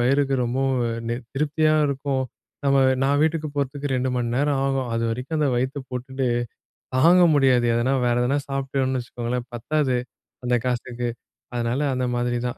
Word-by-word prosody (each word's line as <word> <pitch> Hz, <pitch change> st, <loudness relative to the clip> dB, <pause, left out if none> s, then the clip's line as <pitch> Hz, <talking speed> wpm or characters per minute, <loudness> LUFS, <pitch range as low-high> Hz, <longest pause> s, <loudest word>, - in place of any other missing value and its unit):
வயிறுக்கு 135 Hz, +2 st, +2 dB
ரொம்பவும் 130 Hz, +1 st, 0 dB
அ -, -, -2 dB, 0.2 s
நெ 120 Hz, -, 0 dB, 0.2 s
திருப்தியா 155 Hz, +2 st, +2 dB
இருக்கும். 140 Hz, -1 st, -1 dB, 0.4 s
நம்ம, 140 Hz, 0 st, +4 dB, 0.2 s
நான் 140 Hz, +1 st, +3 dB
வீட்டுக்கு 155 Hz, -1 st, 0 dB
போறதுக்கு 140 Hz, +1 st, -2 dB
2 130 Hz, 0 st, 0 dB
மணி 120 Hz, -1 st, 0 dB
நேரம் 140 Hz, 0 st, +1 dB
ஆகும். 135 Hz, -2 st, -1 dB
அதுவரைக்கும் 115 Hz, +6 st, -2 dB
அந்த 150 Hz, -2 st, +2 dB
வயித்த 130 Hz, +4 st, -1 dB
போட்டுட்டு, 130 Hz, +1 st, -2 dB, 0.7 s
தாங்க 175 Hz, +6 st, +6 dB
முடியாது. 130 Hz, -3 st, +4 dB
எதனா, 120 Hz, +3 st, +1 dB
வேறு 120 Hz, 0 st, +2 dB
எதனா 135 Hz, +4 st, +1 dB
சாப்பிட்டோம்னு 135 Hz, -1 st, -1 dB
வச்சுக்கோங்களேன், 120 Hz, +1 st, -4 dB
பத்தாது. 130 Hz, +2 st, 0 dB, 0.5 s
அந்த 125 Hz, -, +2 dB
காசுக்கு. 120 Hz, -1 st, -2 dB, 0.5 s
அதனால 120 Hz, +3 st, 0 dB
அந்த 130 Hz, 0 st, -1 dB
மாதிரி 120 Hz, 0 st, 0 dB
தான். 120 Hz, -, -5 dB
130 Hz, 155 wpm, -24 LUFS, 125-140 Hz, 0.7 s, தாங்க